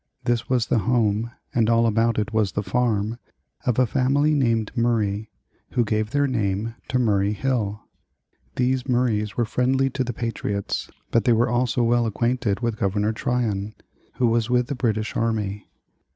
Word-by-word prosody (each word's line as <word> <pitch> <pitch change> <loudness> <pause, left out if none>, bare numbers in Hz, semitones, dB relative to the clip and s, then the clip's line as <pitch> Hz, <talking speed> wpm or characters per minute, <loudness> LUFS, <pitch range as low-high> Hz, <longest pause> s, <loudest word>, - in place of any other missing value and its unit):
This 120 -2 0
was 125 -3 +2
the 115 - +1
home, 115 -1 +1 0.2
and 115 -2 +2
all 115 0 +4
about 115 +1 +2
it 105 +1 -1
was 110 -3 +1
the 105 - -1
farm, 115 -1 0 0.5
of 125 - +2
a 130 - +5
family 140 +5 +2
named 115 -6 +1
Murray 110 -3 0 0.4
(who 120 - +2
gave 110 0 0
their 145 +3 +2
name 110 -3 -1
to 130 - 0
Murray 105 -4 +2
Hill). 105 -4 -1 0.7
These 130 +1 0
Murrays 110 -5 0
were 120 - +2
friendly 130 +3 +1
to 130 0 -1
the 125 - -3
patriots, 105 -4 -3 0.2
but 115 - +2
they 120 - +5
were 115 +2 +2
also 120 0 +1
well 120 0 +2
acquainted 120 -1 0
with 115 -3 -2
Governor 105 +2 0
Tryon, 110 -4 -1 0.4
who 125 - +1
was 115 0 +1
with 125 0 +3
the - - -1
British 110 -3 -1
army. 105 -3 -2
115 Hz, 165 wpm, -23 LUFS, 105-125 Hz, 0.7 s, a